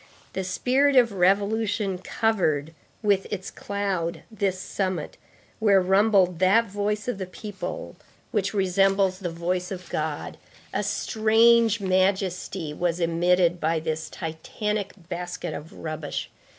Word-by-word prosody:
The 190 Hz, -, -2 dB
spirit 260 Hz, +9 st, +2 dB
of 240 Hz, -3 st, +6 dB
revolution 200 Hz, +1 st, +1 dB
covered 175 Hz, -8 st, 0 dB, 0.3 s
with 200 Hz, -2 st, +2 dB
its 190 Hz, -2 st, -4 dB
cloud 195 Hz, -4 st, -3 dB
this 195 Hz, -3 st, -1 dB
summit 190 Hz, -, -3 dB, 0.4 s
where 205 Hz, -3 st, +5 dB
rumbled 190 Hz, -2 st, +3 dB
that 195 Hz, +5 st, +5 dB
voice 205 Hz, +1 st, -2 dB
of 245 Hz, -5 st, -2 dB
the 190 Hz, -, -4 dB
people 210 Hz, -, -6 dB, 0.4 s
which 195 Hz, -4 st, 0 dB
resembles 195 Hz, -1 st, +2 dB
the 180 Hz, -3 st, -3 dB
voice 180 Hz, +2 st, -2 dB
of 185 Hz, -2 st, -7 dB
God; 155 Hz, -1 st, -3 dB, 0.3 s
a 205 Hz, -, 0 dB
strange 225 Hz, +2 st, +3 dB
majesty 185 Hz, -3 st, 0 dB
was 175 Hz, +2 st, -1 dB
emitted 175 Hz, +1 st, +2 dB
by 160 Hz, 0 st, +1 dB
this 160 Hz, 0 st, -3 dB
titanic 200 Hz, +5 st, -3 dB
basket 175 Hz, +1 st, -4 dB
of 155 Hz, +3 st, -8 dB
rubbish. 155 Hz, -2 st, -5 dB
190 Hz, 125 wpm, -25 LUFS, 175-210 Hz, 0.4 s, of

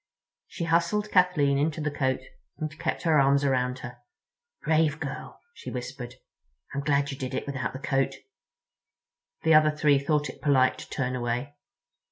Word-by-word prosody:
She 170 Hz, -, -5 dB
hustled 170 Hz, +6 st, +1 dB
Kathleen 155 Hz, -7 st, +3 dB
into 155 Hz, +2 st, 0 dB
the 150 Hz, -1 st, -1 dB
coat 130 Hz, -2 st, 0 dB, 0.4 s
and 155 Hz, -1 st, -4 dB
kept -, -, -2 dB
her 160 Hz, -3 st, +4 dB
arms 140 Hz, +1 st, +4 dB
around 125 Hz, -2 st, +1 dB
her. 120 Hz, 0 st, -9 dB, 0.6 s
"Brave 155 Hz, -1 st, +2 dB
girl," -, -, -6 dB
she -, -, -9 dB
whispered. 125 Hz, 0 st, -6 dB, 0.6 s
"I'm 140 Hz, -, -2 dB
glad 140 Hz, 0 st, +1 dB
you 135 Hz, -, -6 dB
did 130 Hz, 0 st, -4 dB
it -, -, -3 dB
without 135 Hz, -2 st, -3 dB
the -, -, -5 dB
coat." 135 Hz, -1 st, 0 dB, 1.3 s
The 160 Hz, -, +4 dB
other 155 Hz, 0 st, +6 dB
three 150 Hz, -2 st, +3 dB
thought 150 Hz, +1 st, 0 dB
it -, -, -10 dB
polite 135 Hz, -3 st, +3 dB
to -, -, -10 dB
turn 125 Hz, -2 st, -2 dB
away. 125 Hz, +3 st, -2 dB
140 Hz, 165 wpm, -27 LUFS, 130-155 Hz, 1.3 s, other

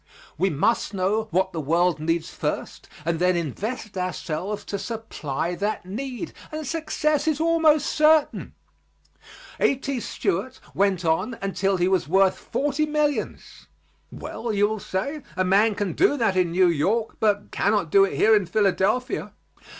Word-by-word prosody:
We 190 Hz, +5 st, +1 dB
must 200 Hz, +7 st, 0 dB
know 205 Hz, +4 st, 0 dB
what 190 Hz, 0 st, 0 dB
the 160 Hz, -, -3 dB
world 170 Hz, +3 st, +1 dB
needs 165 Hz, +1 st, -1 dB
first -, -, -4 dB, 0.2 s
and 165 Hz, -1 st, 0 dB
then 180 Hz, 0 st, +3 dB
invest 210 Hz, -, -4 dB
ourselves 185 Hz, +1 st, -3 dB
to 200 Hz, -, -4 dB
supply 180 Hz, -, -4 dB
that 205 Hz, +2 st, -3 dB
need, 260 Hz, -, -5 dB, 0.2 s
and 310 Hz, 0 st, -5 dB
success 305 Hz, 0 st, -1 dB
is 310 Hz, -2 st, +1 dB
almost 320 Hz, -2 st, +3 dB
certain. 310 Hz, -1 st, +2 dB, 1.0 s
A.T. 275 Hz, -1 st, 0 dB
Stewart 230 Hz, +3 st, -2 dB
went 190 Hz, -3 st, +1 dB
on 210 Hz, +9 st, 0 dB
until 195 Hz, 0 st, 0 dB
he 175 Hz, 0 st, +2 dB
was 190 Hz, -6 st, +1 dB
worth 190 Hz, +3 st, +3 dB
forty 290 Hz, +2 st, -1 dB
millions. 300 Hz, -1 st, -2 dB, 0.4 s
"Well," 235 Hz, -, -5 dB
you 205 Hz, 0 st, +3 dB
will 215 Hz, 0 st, -3 dB
say, 275 Hz, +12 st, -3 dB, 0.2 s
"a 185 Hz, -, +2 dB
man 205 Hz, +3 st, +3 dB
can 200 Hz, -2 st, -2 dB
do 325 Hz, -5 st, +3 dB
that 225 Hz, -6 st, +1 dB
in 180 Hz, -2 st, +2 dB
New 180 Hz, +2 st, +3 dB
York, 200 Hz, +8 st, 0 dB
but 205 Hz, -1 st, +1 dB
cannot 200 Hz, -6 st, 0 dB
do 195 Hz, -, +6 dB
it 195 Hz, -, 0 dB
here 220 Hz, 0 st, +5 dB
in 200 Hz, -4 st, +1 dB
Philadelphia." 210 Hz, +5 st, 0 dB
200 Hz, 150 wpm, -24 LUFS, 185-255 Hz, 1.0 s, do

